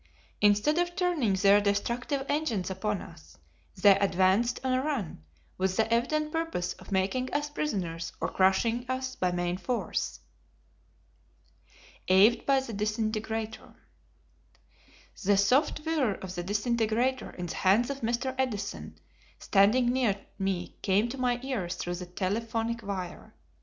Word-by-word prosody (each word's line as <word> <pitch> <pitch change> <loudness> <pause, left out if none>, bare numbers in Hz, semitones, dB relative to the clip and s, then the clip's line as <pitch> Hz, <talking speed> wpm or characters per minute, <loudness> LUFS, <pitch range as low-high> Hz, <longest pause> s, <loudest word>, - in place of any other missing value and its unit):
Instead 210 +10 +4
of 350 0 -1
turning 350 - +1
their 200 +2 +5
destructive 235 +7 -1
engines 235 -12 -1
upon 205 +1 -2
us, 75 0 -15 0.4
they 195 +1 +7
advanced 195 +5 +2
on 260 -1 +1
a 255 - +2
run, 260 - -3 0.4
with 190 0 0
the 225 +1 +2
evident 305 +6 0
purpose 325 - -2
of - - -13
making 200 +7 0
us 295 +1 -1
prisoners 180 - -3
or - - -1
crushing 225 +6 +2
us 260 0 -2
by 180 -1 0
main 175 0 -1
force. 245 +5 -2 1.9
Awed 195 +5 +5
by 275 -1 +4
the 240 -4 -7
Disintegrator. 215 +1 -3 1.5
The 200 +1 +3
soft 270 +9 +2
whirr 290 -11 +1
of 185 -1 -8
the 175 - -3
disintegrator 225 +5 0
in 180 - -5
the 170 - -5
hands 215 +8 +3
of 275 - -6
Mr. 240 +3 -1
Edison 210 -6 -3 0.4
standing 235 +5 +3
near 235 -7 +1 0.2
me 190 -2 -2
came 205 +4 +2
to 270 - -6
my 245 -1 +1
ears 210 -10 -2
through 175 - -4
the 180 0 -6
telephonic 225 +5 -2
wire. 190 -4 -6
220 Hz, 135 wpm, -29 LUFS, 190-255 Hz, 1.9 s, they